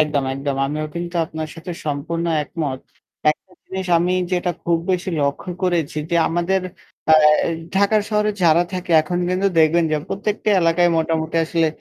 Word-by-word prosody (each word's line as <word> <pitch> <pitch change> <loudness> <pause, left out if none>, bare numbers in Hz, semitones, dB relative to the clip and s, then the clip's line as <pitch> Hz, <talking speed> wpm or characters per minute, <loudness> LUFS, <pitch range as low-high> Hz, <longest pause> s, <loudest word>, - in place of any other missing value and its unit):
একদম, 150 -3 +1
একদম 135 0 -3
আমিও 155 +2 -3
কিন্তু 170 +1 -5
আপনার 155 0 -6
সাথে 170 +1 -7
সম্পূর্ণ 155 +3 -2 0.2
একমত। 145 -4 -4 0.5
একটা 185 +4 -7
জিনিস 190 -1 -5
আমি 175 +2 +1 0.2
যেটা 180 0 +1
খুব 170 -1 +2
বেশি 185 0 -1
লক্ষ্য 140 +5 -2
করেছি 170 -5 0
যে 170 - +2
আমাদের 175 +3 0 0.5
আ - - +8 0.6
ঢাকার 200 +2 +3
শহরে 210 0 +2
যারা 170 0 +5
থাকে 180 -1 -5
এখন 175 +3 -3
কিন্তু 185 +2 +1
দেখবেন 160 +2 +4
যে - - +3
প্রত্যেকটি 210 +1 -2
এলাকায় 170 +1 +3
মোটামুটি 160 0 -1
আসলে 165 0 +1
170 Hz, 160 wpm, -20 LUFS, 155-180 Hz, 0.6 s, আ